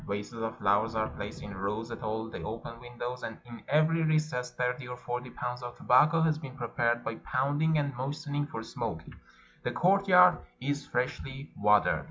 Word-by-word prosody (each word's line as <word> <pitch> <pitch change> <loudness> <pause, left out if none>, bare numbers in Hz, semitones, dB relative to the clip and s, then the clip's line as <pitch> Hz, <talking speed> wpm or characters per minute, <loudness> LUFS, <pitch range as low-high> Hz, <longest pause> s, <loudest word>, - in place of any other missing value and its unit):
Vases 105 +3 -4
of 110 +2 -3
flowers 105 +1 +2
are 110 0 +1
placed 105 0 -7
in 100 -1 -7
rows 105 +5 -3
at 115 - -6
all 110 +1 -2
the 115 - -7
open 115 +1 -6
windows, 120 +1 -6
and 110 - -5
in 120 -1 -10
every 155 +3 +3
recess 155 -6 +1
thirty 125 +1 -2
or 125 0 -6
forty 125 0 -4
pounds 125 0 -4
of 120 0 -7
tobacco 155 +6 +5
have 155 -1 +2
been 135 -2 -8
prepared 120 0 0
by 115 - -2
pounding 145 +4 +1
and 140 -2 0
moistening 145 +2 -2
for 115 -6 -6
smoking; 110 -9 -5 0.5
the - - -1
courtyard 180 +4 +5 0.2
is 140 +2 -2
freshly 135 +2 -3
wa 105 0 +6
tered. - - +1
125 Hz, 185 wpm, -30 LUFS, 115-145 Hz, 0.5 s, wa